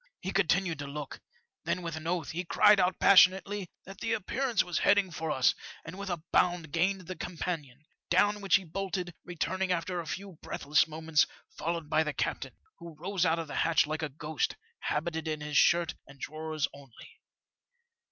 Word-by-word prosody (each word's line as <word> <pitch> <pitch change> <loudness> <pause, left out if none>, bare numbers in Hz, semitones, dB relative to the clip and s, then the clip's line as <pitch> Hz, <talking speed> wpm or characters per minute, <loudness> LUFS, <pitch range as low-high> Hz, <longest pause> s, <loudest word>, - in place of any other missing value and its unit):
''He 190 - -2
continued 180 -3 +2
to 145 - -5
look; 145 0 -6 0.4
then, 180 - -1
with 165 -2 -4
an 160 0 -6
oath, 170 -3 -1
he 175 +2 -3
cried 205 +3 +5
out 180 -1 +2
passionately 190 0 +5 0.2
that 195 +1 -11
the 225 0 -1
appearance 230 +2 0
was 175 -2 -2
heading 200 -3 +3
for 160 0 -4
us, 130 -4 +3 0.3
and, 165 - -7
with 200 0 -6
a 170 -3 -3
bound, 175 -4 +2
gained 185 +4 +1
the 185 +1 -7
companion, 155 -5 -5 0.2
down 205 +4 +3
which 195 - +4
he 195 - +2
bolted, 180 0 -4
returning 185 +2 -2
after 180 +1 -1
a 165 - -6
few 190 -2 -6
breathless 150 +2 +1
moments 160 -1 +1 0.3
followed 165 -1 -3
by 155 - +3
the 155 -2 -1
captain, - - -3 0.2
who 170 -2 -10
rose 180 +2 0
out 165 +1 +2
of 165 -1 -4
the 145 - -5
hatch 165 -1 +3
like 155 +1 -3
a 155 - -2
ghost^ 150 +2 -2 0.2
habited 160 +1 -2
in 155 -1 -2
his 150 0 -5
shirt 170 +1 +4
and 135 0 -15
drawers 155 0 -3
only. 140 -4 -15
170 Hz, 185 wpm, -30 LUFS, 155-185 Hz, 0.4 s, cried